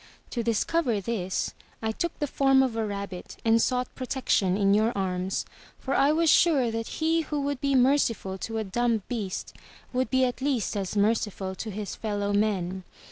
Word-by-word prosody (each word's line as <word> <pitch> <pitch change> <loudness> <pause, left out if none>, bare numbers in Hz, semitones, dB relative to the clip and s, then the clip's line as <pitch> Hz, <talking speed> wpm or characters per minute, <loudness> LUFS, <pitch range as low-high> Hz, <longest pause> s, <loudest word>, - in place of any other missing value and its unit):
To 240 - -1
discover 235 +2 +1
this, 195 -3 -2 0.3
I 220 0 -1
took 340 +9 -3
the 295 - -1
form 270 -1 +4
of 255 -4 -1
a 225 - 0
rabbit 200 -3 -5
and 225 0 +5
sought 250 +1 0
protection 250 -8 0
in 200 -1 +3
your 215 +3 +3
arms, 185 0 -1 0.3
for 270 - -3
I 275 +2 +4
was 330 +2 +2
sure 285 -8 +4
that 225 0 -3
he 325 +1 +2
who 300 -1 -3
would 280 -1 -2
be 275 -1 +1
merciful 245 -7 +2
to 225 +3 -4
a 220 - 0
dumb 225 +1 0
beast, 210 -7 -4 0.4
would 255 +1 0
be 260 -1 +3
at 250 +1 -3
least 260 -9 0
as 195 0 -2
merciful 205 -2 0
to 215 +3 -6
his 205 0 -5
fellow 205 -2 -2
men. 190 -3 0
225 Hz, 185 wpm, -27 LUFS, 200-265 Hz, 0.4 s, and